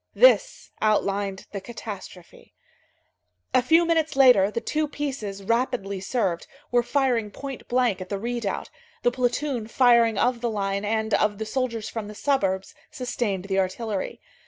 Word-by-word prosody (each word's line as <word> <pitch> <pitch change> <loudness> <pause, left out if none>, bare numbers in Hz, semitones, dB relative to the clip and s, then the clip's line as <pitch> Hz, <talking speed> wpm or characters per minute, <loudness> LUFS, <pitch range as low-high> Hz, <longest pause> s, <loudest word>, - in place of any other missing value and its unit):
This - - +4
outlined 200 -2 0
the 200 - -5
catastrophe. 195 -5 -10 1.0
A - - +5
few 325 +7 +4
minutes 320 -3 +1
later, 250 -8 +6
the 235 - -2
two 305 +6 -1
pieces, 255 -10 -4
rapidly 230 -3 -1
served, 190 -4 -1 0.2
were 245 0 +4
firing 240 -4 +1
point 270 +5 -8
blank 240 -6 +1
at 185 - -7
the 200 - -2
redoubt; 235 -1 -3 0.3
the 245 - +4
platoon 245 -1 -1
firing 235 -2 +4
of 245 +2 +1
the 240 - 0
line 200 -2 -2
and 220 0 -1
of 210 -1 +2
the 220 - -4
soldiers 230 -2 -2
from 225 -3 -5
the 210 - -9
suburbs 195 -9 0 0.2
sustained 225 -7 -3
the 195 -1 0
artillery. 195 +2 -2
230 Hz, 150 wpm, -25 LUFS, 200-255 Hz, 1.0 s, later